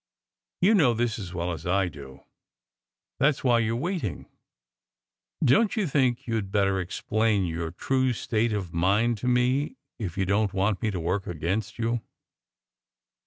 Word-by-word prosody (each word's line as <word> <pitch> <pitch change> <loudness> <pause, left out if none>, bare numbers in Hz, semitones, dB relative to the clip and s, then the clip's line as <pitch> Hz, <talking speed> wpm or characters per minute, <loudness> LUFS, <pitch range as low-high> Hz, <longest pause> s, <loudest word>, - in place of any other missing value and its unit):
"You 195 +5 +5
know 145 - +4
this 115 -1 -1
as 95 -4 -6
well 90 0 -2
as 80 0 -6
I 95 +1 +2
do. 70 -4 -10 1.0
That 135 - +5
s - - -12
why 120 -3 +4
you 115 0 0
re 120 - -3
waiting. 175 - -3 1.2
Don 215 - +5
t 220 - -4
you 205 - +1
think 130 -5 +1
you 115 -2 0
d 100 - -7
better 100 -1 +1
explain 105 +2 0
your 85 -1 -3
true 130 +9 0
state 115 0 0
of 95 -5 -3
mind 105 +7 +2
to 125 - -3
me, 130 - +1 0.2
if 95 -6 -4
you 95 - +1
don 100 +2 +2
t 95 - -9
want 100 +1 +1
me 110 - +1
to 95 -4 -3
work 90 +4 -1
against 90 +6 -2
you?" 115 0 -1
110 Hz, 175 wpm, -26 LUFS, 95-120 Hz, 1.2 s, You